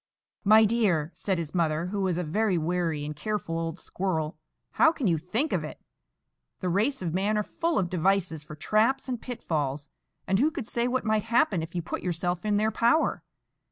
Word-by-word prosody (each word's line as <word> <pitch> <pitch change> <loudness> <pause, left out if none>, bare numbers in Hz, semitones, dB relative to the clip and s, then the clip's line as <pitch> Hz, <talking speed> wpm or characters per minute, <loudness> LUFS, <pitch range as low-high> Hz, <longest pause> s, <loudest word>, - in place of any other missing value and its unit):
"My 215 +2 +7
dear," 195 -9 +1
said 190 -3 -1
his 165 -3 -4
mother, 165 -2 +1
who 200 +2 -2
was 185 -3 0
a 180 - -1
very 190 +4 +1
wary 165 -2 -1
and 150 0 -5
careful 165 -1 -3
old 165 0 -3
squirrel, 165 -5 -2 0.4
"how 325 - +5
can 295 -6 -4
you 170 -5 +2
think 225 - -1
of - - 0
it? - - -7 0.8
The 185 - -2
race 210 +6 +1
of 165 -3 -2
man 200 +4 +1
are 210 - +1
full 335 +9 -1
of 185 - +1
devices 180 -2 0
for 150 0 -10
traps 225 - +1
and 245 -3 -3
pitfalls, 150 - -3 0.4
and 190 +1 +1
who 295 - +4
could 295 -8 -6
say 235 0 0
what 255 0 -1
might 215 -1 +1
happen 225 -6 +2
if 165 +2 -7
you 175 - -1
put - - -4
yourself 175 0 -2
in 210 -1 +2
their 215 +1 +2
power? 235 +9 +2
190 Hz, 200 wpm, -27 LUFS, 165-220 Hz, 0.8 s, My